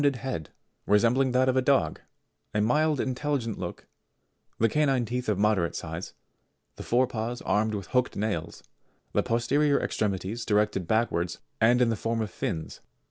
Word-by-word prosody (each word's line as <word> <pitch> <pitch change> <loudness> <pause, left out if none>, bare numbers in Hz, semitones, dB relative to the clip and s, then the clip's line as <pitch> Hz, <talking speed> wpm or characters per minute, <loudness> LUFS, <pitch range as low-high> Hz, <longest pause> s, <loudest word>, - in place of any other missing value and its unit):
have - - +5
a - - -6
round - - -13
head 130 - -4 0.4
resembling 120 +6 +3
that 130 +1 +3
of 130 - +2
a 130 - +4
dog, 135 +1 +2 0.5
a - - +3
mild 150 +6 +2
intelligent 130 -4 -2
look, 90 -1 -6 0.7
the 115 - +3
canine 135 -1 +2
teeth 125 +1 -3
of 105 - +1
moderate 100 -4 +2
size, 80 +2 -6 0.6
the - - -9
fore 125 +2 +2
paws 120 0 -4
armed 110 +1 +1
with 100 -2 -4
hooked 125 -1 +1
nails, 100 -6 -3 0.5
the - - +3
posterior 140 +5 +2
extremities 105 +3 -2
directed 105 -4 +1
backwards 90 -6 0 0.2
and 120 +3 +5
in 120 - +2
the 115 - +1
form 115 +2 -2
of 110 -3 -2
fins. 80 -3 -4
115 Hz, 170 wpm, -27 LUFS, 105-130 Hz, 0.7 s, have